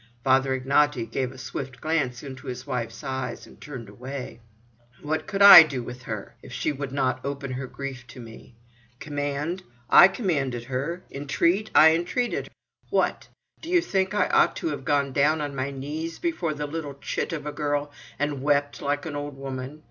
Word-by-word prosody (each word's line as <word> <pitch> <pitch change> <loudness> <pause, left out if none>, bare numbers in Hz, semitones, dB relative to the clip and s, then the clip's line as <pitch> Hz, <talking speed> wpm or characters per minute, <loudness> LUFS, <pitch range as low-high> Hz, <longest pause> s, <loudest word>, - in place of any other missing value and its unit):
Father 130 0 +3
Ignaty 140 0 +2
gave 125 +3 -3
a 130 - -13
swift 130 0 -6
glance 150 -6 -1
into 130 -2 -9
his 125 0 -6
wife's 125 -4 -4
eyes, 130 -1 -4
and - - -18
turned 130 -7 -8
away. 125 +4 -7 0.6
"What 155 +1 -2
could 200 0 +1
I 195 -3 +13
do 140 -6 -1
with 125 +1 -8
her, 110 -5 -6
if - - -12
she - - -1
would 140 -2 -5
not 130 -2 -1
open 140 -1 -4
her 130 +1 -4
grief 130 -2 -7
to 130 - -12
me. 115 0 -12 0.4
Command? 145 +4 -3 0.3
I 175 - +10
commanded 145 - -2
her. 140 +8 -3
Intreat? 170 +9 0
I 160 - +9
intreated. 175 +9 -1 0.4
What? - - 0 0.3
Do 320 - -8
you 355 0 +5
think 195 - -1
I 205 - +3
ought - - +4
to 335 - -2
have - - -5
gone 140 -3 +1
down 150 +3 +3
on 145 -2 -4
my 130 +1 -2
knees 150 +4 -5
before 185 - -2
the 150 0 -3
little 145 -2 -5
chit 140 - -3
of 155 -3 -4
a 150 - -3
girl, 145 -1 -2 0.3
and 145 0 -2
wept, 145 0 +1
like 145 +1 -1
an 155 -3 -5
old 145 -1 -5
woman! 135 +1 -6
140 Hz, 185 wpm, -25 LUFS, 130-155 Hz, 0.6 s, I